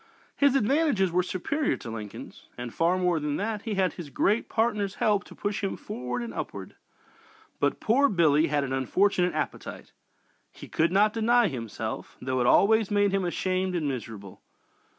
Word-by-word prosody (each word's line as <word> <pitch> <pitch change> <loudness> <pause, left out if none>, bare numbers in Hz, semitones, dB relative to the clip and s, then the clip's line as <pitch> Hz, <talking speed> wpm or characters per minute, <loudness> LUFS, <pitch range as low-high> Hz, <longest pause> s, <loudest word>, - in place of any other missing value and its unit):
His 280 -1 +3
advantages 270 - +2
were 180 +2 +2
superior 265 - -1
to 115 - -8
Lincoln's. 105 -2 -9
And 120 -1 -6
far 170 +3 +2
more 180 -3 +1
than 150 -1 -2
that, 210 +2 -2
he 215 -1 -3
had 190 -1 +1
his 170 -5 -8
great 210 +10 +1
partner's 210 -3 0
help 205 -2 +1
to - - -13
push 205 0 -3
him 195 - -2
forward 125 - -5
and 235 - -6
upward. - - -6 0.8
But - - 0
"poor 275 +5 +3
Billy" 160 -4 +3
had 145 -1 0
an 130 -1 -3
unfortunate 180 +6 +1
appetite. 155 - -5 0.6
He - - -12
could 165 +2 +1
not 210 +3 +3
deny 230 -1 +3
himself, 115 -4 -6
though 130 0 -2
it 120 - +2
always 220 - +4
made 205 -1 +2
him 195 -1 0
ashamed 185 +1 -1
and 160 -4 -1
miserable. 110 -7 -6
185 Hz, 170 wpm, -27 LUFS, 145-210 Hz, 0.8 s, always